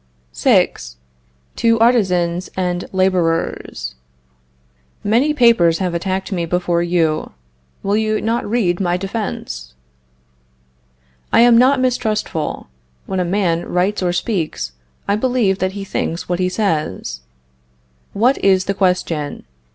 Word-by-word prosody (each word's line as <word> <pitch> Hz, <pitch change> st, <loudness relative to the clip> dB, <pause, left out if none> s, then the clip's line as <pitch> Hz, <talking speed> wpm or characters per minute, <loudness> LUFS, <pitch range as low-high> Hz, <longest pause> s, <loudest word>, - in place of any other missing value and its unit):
VI. -, -, +4 dB, 0.8 s
TO 230 Hz, -1 st, +2 dB
ARTISANS 185 Hz, -7 st, +2 dB
AND 180 Hz, -1 st, -1 dB
LABORERS. 170 Hz, -, 0 dB, 1.1 s
Many 235 Hz, +9 st, +2 dB
papers 230 Hz, -, +4 dB
have 180 Hz, -3 st, -2 dB
attacked 190 Hz, +3 st, -2 dB
me 170 Hz, -3 st, -1 dB
before 175 Hz, 0 st, 0 dB
you. 170 Hz, -3 st, 0 dB, 0.5 s
Will 200 Hz, +1 st, +1 dB
you 215 Hz, 0 st, +1 dB
not 225 Hz, 0 st, -1 dB
read 195 Hz, -7 st, +1 dB
my 175 Hz, -2 st, +1 dB
defense? 190 Hz, -, -5 dB, 1.6 s
I -, -, +5 dB
am 240 Hz, 0 st, +6 dB
not 255 Hz, +3 st, +5 dB
mistrustful. 220 Hz, -10 st, -1 dB, 0.4 s
When 190 Hz, -, -2 dB
a -, -, +2 dB
man 175 Hz, -2 st, 0 dB
writes 185 Hz, +4 st, +1 dB
or 180 Hz, -1 st, +1 dB
speaks, 175 Hz, -, -2 dB, 0.4 s
I 200 Hz, -, +2 dB
believe 220 Hz, -4 st, +1 dB
that 185 Hz, +1 st, -1 dB
he 200 Hz, -1 st, -5 dB
thinks 170 Hz, -3 st, -3 dB
what 175 Hz, 0 st, -1 dB
he 185 Hz, 0 st, +1 dB
says. 155 Hz, -, -2 dB, 0.9 s
What 245 Hz, +7 st, +2 dB
is 190 Hz, -1 st, +4 dB
the 195 Hz, -, 0 dB
question? 180 Hz, -6 st, -1 dB
185 Hz, 120 wpm, -18 LUFS, 175-215 Hz, 1.6 s, am